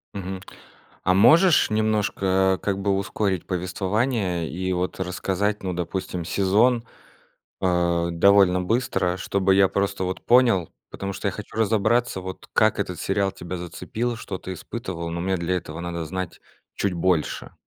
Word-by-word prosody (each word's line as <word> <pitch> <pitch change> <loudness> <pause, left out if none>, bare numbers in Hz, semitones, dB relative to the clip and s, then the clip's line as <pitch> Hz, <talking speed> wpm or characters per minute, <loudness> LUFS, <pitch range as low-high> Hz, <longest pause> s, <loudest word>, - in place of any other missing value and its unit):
Мгм. 95 -1 -5 0.6
А 90 - +3
можешь 155 - +6
немножко 100 -3 +1
как 100 -1 -1
бы 100 +1 0
ускорить 100 -2 -1
повествование 95 0 -1
и 95 +2 -2
вот 90 +1 -2
рассказать, 95 +3 -1
ну 95 -1 -2
допустим, 90 0 -3
сезон, 110 +7 +2 0.8
э, 85 -2 +1
довольно 95 +1 +5
быстро, 90 -3 0
чтобы 95 +1 +1
я 95 0 +6
просто 100 -1 -1
вот 90 0 -4
понял, 120 -8 +4 0.2
потому 100 0 -5
что 100 - -3
я - - +1
хочу 105 - -9
разобраться, 110 0 +1
вот 95 0 -8
как - - +3
этот - - -3
сериал 100 -1 0
тебя 90 0 -6
зацепил, 115 +7 -4
что 95 -4 -6
ты 95 - -6
испытывал, 90 -5 -6
но 85 0 -3
мне 95 +1 0
для 85 +1 -1
этого 80 -2 -7
надо 85 -1 -4
знать 95 +2 -5 0.3
чуть 100 -2 0
больше. 85 -2 0
95 Hz, 150 wpm, -24 LUFS, 90-105 Hz, 0.8 s, можешь